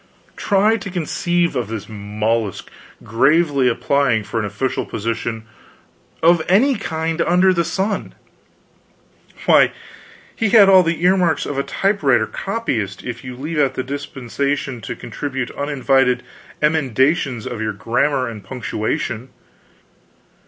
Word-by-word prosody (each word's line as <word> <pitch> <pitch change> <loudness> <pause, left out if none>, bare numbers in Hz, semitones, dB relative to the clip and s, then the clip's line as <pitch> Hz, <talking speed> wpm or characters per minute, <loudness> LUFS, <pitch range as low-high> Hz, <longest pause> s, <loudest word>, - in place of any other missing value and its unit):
Try 210 +2 +2
to 200 - -7
conceive 175 -1 -1
of 125 -4 -1
this 110 -2 -6
mollusk 105 0 -2 0.3
gravely 140 +3 +2
applying 125 -2 +1
for 115 +2 -3
an 105 - -2
official 105 +6 -2
position, 115 +1 -4 0.8
of 170 0 +5
any 240 +10 +4
kind 160 -4 -2
under 180 +2 +4
the 170 -1 +1
sun! 190 +5 -2 1.3
Why, - - +5 0.6
he 225 - 0
had 205 -1 +7
all 190 -1 +8
the 165 -1 -1
earmarks 180 -3 +3
of 140 -1 -3
a - - 0
typewriter 145 - +1
copyist, 120 - -3
if 125 -1 -6
you 125 -1 -7
leave 150 +5 -4
out 140 -3 +2
the 130 - -2
disposition 140 -1 -3
to - - -5
contribute 130 -4 -5
uninvited 135 -3 +1 0.4
emendations 135 -4 +1
of 115 -3 -5
your 110 -1 -1
grammar 125 +6 0
and 110 -3 -8
punctuation. 120 0 -3
140 Hz, 125 wpm, -19 LUFS, 115-170 Hz, 1.3 s, all